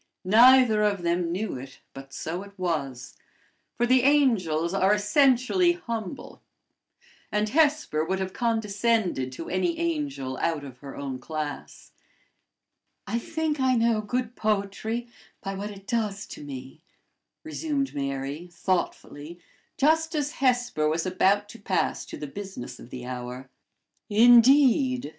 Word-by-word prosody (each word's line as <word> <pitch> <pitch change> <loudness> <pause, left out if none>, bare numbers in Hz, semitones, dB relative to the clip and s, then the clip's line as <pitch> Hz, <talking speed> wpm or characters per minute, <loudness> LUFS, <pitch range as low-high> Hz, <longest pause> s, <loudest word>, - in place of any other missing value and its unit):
Neither 235 +2 +6
of 200 -4 +1
them 170 0 0
knew 195 +3 -3
it, 135 +1 -11
but 135 0 -11
so 165 +6 -4
it 200 0 -13
was; 140 -8 -3 0.6
for 240 - +2
the 255 +1 +4
angels 210 - +2
are 195 +1 +3
essentially 260 - +3
humble, 230 - -6 0.9
and 210 0 0
Hesper 295 - +2
would 190 +4 -1
have 190 0 -4
condescended 220 - 0
to 165 - -7
any 185 - 0
angel 295 - -2
out 160 -3 -1
of 130 -3 -11
her 140 -1 -9
own 135 -2 -5
class. 150 +1 -6 1.1
"I 230 +4 -1
think 320 +1 -2
I 260 -1 +3
know 230 -2 +2
good 245 +2 -3
poetry 215 +3 -2 0.3
by 195 0 -5
what 200 +2 -5
it 200 -1 -11
does 210 -4 -2
to - - -9
me," 135 +2 -9 0.6
resumed 305 -3 -2
Mary, 140 +3 -4
thoughtfully, 170 -2 -3 0.4
just 320 +3 +2
as 295 -1 -1
Hesper 245 - +1
was 160 +1 -1
about 195 +3 +2
to 230 - -11
pass 195 -2 -1
to - - -8
the - - -6
business 145 -6 -8
of - - -12
the 125 -1 -8
hour. 125 +1 -7 0.6
"Indeed!" 245 - +5
205 Hz, 135 wpm, -26 LUFS, 155-250 Hz, 1.1 s, Neither